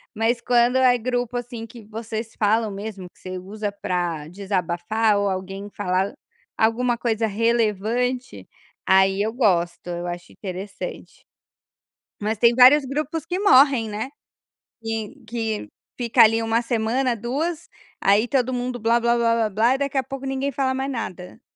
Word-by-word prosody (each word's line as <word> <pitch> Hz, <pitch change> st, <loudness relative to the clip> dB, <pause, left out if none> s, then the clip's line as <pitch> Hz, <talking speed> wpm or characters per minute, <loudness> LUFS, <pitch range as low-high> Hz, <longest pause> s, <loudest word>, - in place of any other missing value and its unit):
Mas 230 Hz, +2 st, +1 dB
quando 245 Hz, +1 st, +3 dB
é 255 Hz, -1 st, +5 dB
grupo, 245 Hz, 0 st, -2 dB
assim, 240 Hz, -2 st, -6 dB
que 230 Hz, -2 st, -13 dB
vocês 225 Hz, +1 st, -6 dB
falam 215 Hz, 0 st, +2 dB
mesmo, 200 Hz, -2 st, -7 dB
que -, -, -28 dB
você 185 Hz, 0 st, -6 dB
usa 205 Hz, +2 st, -5 dB
pra 175 Hz, -6 st, -3 dB
desabafar 195 Hz, +3 st, 0 dB
ou 200 Hz, 0 st, +1 dB
alguém 195 Hz, +2 st, -5 dB
falar 190 Hz, -1 st, -1 dB, 0.4 s
alguma 235 Hz, +2 st, +2 dB
coisa 230 Hz, -1 st, 0 dB
relevante, 230 Hz, +3 st, 0 dB, 0.4 s
aí 190 Hz, +1 st, +4 dB
eu 220 Hz, +1 st, -1 dB
gosto, 175 Hz, -8 st, +1 dB
eu 175 Hz, 0 st, -4 dB
acho 175 Hz, 0 st, -6 dB
interessante. 200 Hz, -, -8 dB, 1.0 s
Mas 215 Hz, +2 st, -1 dB
tem 235 Hz, 0 st, +5 dB
vários 265 Hz, +3 st, +7 dB
grupos 300 Hz, +3 st, -3 dB
que 360 Hz, +1 st, -2 dB
morrem, 265 Hz, -, +5 dB
né. 215 Hz, +4 st, -4 dB, 0.7 s
Que 225 Hz, -2 st, -4 dB
que 225 Hz, -, -3 dB, 0.3 s
fica 235 Hz, -2 st, +4 dB
ali 225 Hz, +1 st, +5 dB
1 225 Hz, +1 st, +1 dB
semana, 235 Hz, +2 st, 0 dB
2, 280 Hz, +9 st, -3 dB, 0.3 s
aí 205 Hz, +4 st, +4 dB
todo 255 Hz, 0 st, 0 dB
mundo 245 Hz, 0 st, -3 dB
"blá 230 Hz, +2 st, +3 dB
blá 235 Hz, 0 st, +2 dB
blá 230 Hz, -2 st, +2 dB
blá" 225 Hz, +6 st, +3 dB
e -, -, -2 dB
daqui 280 Hz, -1 st, -1 dB
a -, -, +2 dB
pouco 270 Hz, +1 st, -7 dB
ninguém 270 Hz, +1 st, -1 dB
fala 265 Hz, 0 st, 0 dB
mais 270 Hz, +1 st, -2 dB
nada. 185 Hz, -3 st, -6 dB
225 Hz, 155 wpm, -23 LUFS, 200-245 Hz, 1.0 s, vários